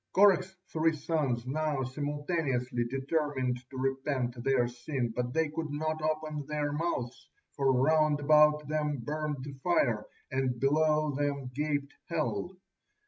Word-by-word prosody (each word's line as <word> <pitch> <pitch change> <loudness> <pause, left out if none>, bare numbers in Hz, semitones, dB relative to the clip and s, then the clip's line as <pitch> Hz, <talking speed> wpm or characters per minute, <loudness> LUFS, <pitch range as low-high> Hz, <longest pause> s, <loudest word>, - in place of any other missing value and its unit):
Korah's 190 -1 +4 0.2
three 160 0 +2
sons 140 -6 -1
now 145 0 -1
simultaneously 145 -3 -1
determined 135 -1 -1
to 130 - -9
repent 130 -2 -1
their 130 -2 +3
sin, 120 0 -3
but 125 0 -1
they 160 +2 +1
could 155 +1 -4
not 155 +2 -2
open 155 -1 -1
their 150 -1 -1
mouths, 145 -6 -3 0.3
for 135 -2 +3
round 150 +3 +3
about 150 0 +5
them 150 -1 0
burned 150 +2 -3
the 140 0 -6
fire, 120 -11 +2 0.2
and 130 -2 0
below 150 +2 +3
them 140 -2 -2
gaped 145 0 -1
hell. 170 +3 -2
145 Hz, 135 wpm, -30 LUFS, 130-155 Hz, 0.3 s, about